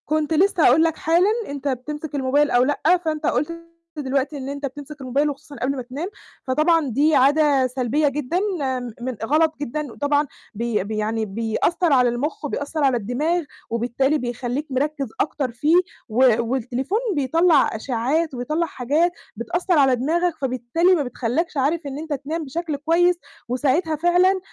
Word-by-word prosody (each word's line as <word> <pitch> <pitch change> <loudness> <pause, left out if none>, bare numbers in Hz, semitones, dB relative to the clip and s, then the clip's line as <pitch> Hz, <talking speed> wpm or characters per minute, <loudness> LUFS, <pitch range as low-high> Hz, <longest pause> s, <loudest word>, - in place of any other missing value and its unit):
كنت 310 +1 0
لسّه 370 +1 +3
هاقول 285 +7 +6
لك 325 -1 +1
حالًا، 345 +6 +3 0.2
أنت 285 0 -5
بتمسك 295 +3 -4
الموبايل 285 +2 +2
أو 245 0 +4
لأ، 300 +6 +2
فأنت 310 -1 -2
قُلت 335 +7 -1 0.3
دلوقتي 280 +1 -1
إن 270 0 -5
أنت 285 0 -4
بتمسك 285 +2 -8
الموبايل 275 +3 +1
وخصوصًا 290 +1 -9
قبل 275 +1 -1
ما 260 - -4
تنام، 265 +8 -5 0.4
فطبعًا 305 +2 +2
دي 290 +6 +3
عادة 280 0 +4
سلبيّة 260 +4 0
جدًا 295 +4 -1 0.6
م 250 - -3 0.2
غلط 310 +5 +3
جدًا 290 0 -3
وطبعًا 290 +3 0 0.3
بي 225 -2 -1
بي 215 +2 -4
يعني 220 +1 -1
بيأثّر 230 - 0
على 250 -2 +4
المُخ 285 +6 -3
وبيأثّر 290 +2 -3
على 265 -3 +3
الدماغ 295 - -1 0.3
وبالتالي 245 +5 0
بيخلّيك 245 +3 -3
مركّز 280 +1 -1
أكتر 275 -3 -1
فيه 295 +8 +2 0.3
و 245 +1 +4
والتليفون 260 - -1 0.2
بيطلّع 305 +1 +3
أشعّات 270 +7 -1
وبيطلّع 305 +7 -1
حاجات 305 +5 0 0.2
بتأثّر 345 - 0
على 265 -2 +5
دماغك، 335 +8 0
فبالتالي 265 +8 +2
ما 305 - 0
بتخلّكش 255 +6 -2
عارف 295 +5 +1
إن 275 -1 -5
أنت 315 0 -4
تنام 300 +4 -4
بشكل 315 +2 -3
كويس 335 +5 +3 0.3
وساعتها 290 +6 +1
فعلًا 355 +4 +3
285 Hz, 155 wpm, -22 LUFS, 255-315 Hz, 0.6 s, هاقول